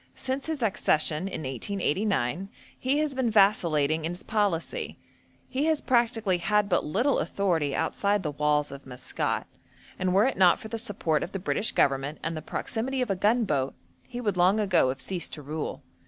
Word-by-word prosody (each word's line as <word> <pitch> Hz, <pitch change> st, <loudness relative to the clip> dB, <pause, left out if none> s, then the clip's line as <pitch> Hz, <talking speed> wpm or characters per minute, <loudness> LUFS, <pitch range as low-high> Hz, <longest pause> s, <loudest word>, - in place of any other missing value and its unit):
Since 265 Hz, +2 st, -3 dB
his 310 Hz, -6 st, -2 dB
accession, 170 Hz, -5 st, +1 dB
in 185 Hz, -, -5 dB
1889, 185 Hz, -, -1 dB, 0.3 s
he 265 Hz, +3 st, +1 dB
has 300 Hz, -2 st, 0 dB
been 260 Hz, -3 st, 0 dB
vacillating 165 Hz, -8 st, +3 dB
in 165 Hz, +2 st, -2 dB
his 175 Hz, -, -8 dB
policy; 205 Hz, -6 st, -1 dB, 0.5 s
he 275 Hz, +3 st, -1 dB
has 315 Hz, -2 st, +2 dB
practically 230 Hz, -6 st, +1 dB
had 210 Hz, +3 st, +2 dB
but 180 Hz, -3 st, +2 dB
little 235 Hz, -, +1 dB
authority 165 Hz, -5 st, 0 dB
outside 205 Hz, -1 st, 0 dB
the 150 Hz, -, -2 dB
walls 150 Hz, 0 st, +1 dB
of 140 Hz, -1 st, -10 dB
Maskat, 125 Hz, -1 st, -2 dB, 0.5 s
and 185 Hz, 0 st, +1 dB
were 195 Hz, +4 st, +4 dB
it 265 Hz, -, 0 dB
not 185 Hz, -2 st, +5 dB
for 220 Hz, -, -9 dB
the 230 Hz, -, -3 dB
support 175 Hz, -8 st, -1 dB
of 175 Hz, -, -5 dB
the -, -, -1 dB
British 200 Hz, +3 st, 0 dB
Government 140 Hz, +2 st, +1 dB
and 165 Hz, +1 st, -2 dB
the 155 Hz, -, -4 dB
proximity 250 Hz, -, -2 dB
of 230 Hz, -, -2 dB
a -, -, +1 dB
gunboat, 195 Hz, -, +1 dB, 0.3 s
he 245 Hz, -1 st, -6 dB
would 205 Hz, -6 st, -1 dB
long 185 Hz, +4 st, +4 dB
ago 190 Hz, -10 st, +3 dB
have 135 Hz, +1 st, -3 dB
ceased 170 Hz, +6 st, -3 dB
to 150 Hz, -, -7 dB
rule. 150 Hz, 0 st, -5 dB
190 Hz, 185 wpm, -27 LUFS, 155-220 Hz, 0.5 s, not